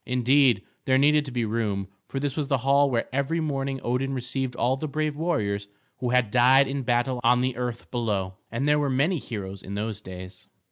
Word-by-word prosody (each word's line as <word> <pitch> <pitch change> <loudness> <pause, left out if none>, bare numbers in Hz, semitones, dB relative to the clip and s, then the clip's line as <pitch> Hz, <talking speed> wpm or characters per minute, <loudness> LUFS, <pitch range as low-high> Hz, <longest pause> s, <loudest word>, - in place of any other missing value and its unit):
Indeed, 125 -3 +3 0.2
there 130 0 +4
needed 150 +2 +4
to 135 - -7
be 120 -2 -1
room, 105 -3 -1 0.2
for 135 - -4
this 140 -1 -2
was 150 -3 -2
the 135 -1 +2
hall 140 +1 +4
where 120 -3 0
every 140 +5 0
morning 135 -3 -2
Odin 135 +3 -1
received 130 0 -3
all 125 +2 +1
the 155 +3 -4
brave 150 +1 -2
warriors 105 -11 -1 0.3
who 125 - -1
had 125 -4 +2
died 130 +2 +5
in 135 +1 -2
battle 120 0 0
on 120 +1 +4
the 130 -1 0
earth 120 -1 -5
below; 105 -6 -1 0.2
and 120 +5 -1
there 150 0 +4
were 145 -1 0
many 150 +7 +1
heroes 100 -6 -6
in 100 - -7
those 105 0 -3
days. 95 -1 -10
125 Hz, 205 wpm, -26 LUFS, 115-140 Hz, 0.3 s, died